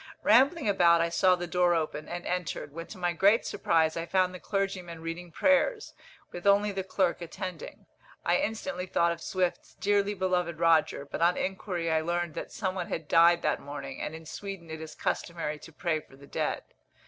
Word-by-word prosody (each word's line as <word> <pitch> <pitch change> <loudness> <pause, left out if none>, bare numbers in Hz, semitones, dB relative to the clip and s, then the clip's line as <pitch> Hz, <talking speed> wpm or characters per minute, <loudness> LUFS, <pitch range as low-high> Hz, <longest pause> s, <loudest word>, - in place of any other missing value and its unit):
Rambling 270 - +4
about, 175 -4 +5
I 170 0 +2
saw 185 +2 +4
the 175 0 -4
door 175 0 +2
open, 155 -2 -3
and 175 0 -5
entered, 180 -5 -3
when 165 +1 -7
to 210 - -10
my 175 -1 0
great 200 +6 +4
surprise 160 -1 +1
I 165 0 -3
found 185 +1 +2
the 185 - -8
clergyman 190 -4 -3
reading 170 +1 -6
prayers, 290 - +2 0.4
with 175 +3 -5
only 205 +1 +4
the 195 -1 -3
clerk 185 -2 0
attending. 180 +1 -7 0.4
I - - +4
instantly 220 -3 -3
thought 170 -1 +2
of 170 0 -5
Swift's 185 -2 -2
"Dearly 205 0 +1
beloved 180 -3 0
Roger," 165 -4 +3
but 145 - -6
on 175 +1 +4
inquiry 185 -3 -2
I 160 0 +2
learnt 175 0 -1
that - - -6
some 190 -3 -2
one 180 -2 -4
had 160 -2 -4
died 170 +1 +5
that - - +1
morning, 145 +1 -7
and 155 - -4
in 160 0 -10
Sweden 190 -1 -7
it 160 0 -6
is 160 -1 -8
customary 160 -3 -2
to 165 - -12
pray 165 -1 -1
for 135 - -18
the 140 +1 -15
dead. - - -2
175 Hz, 195 wpm, -29 LUFS, 165-190 Hz, 0.4 s, about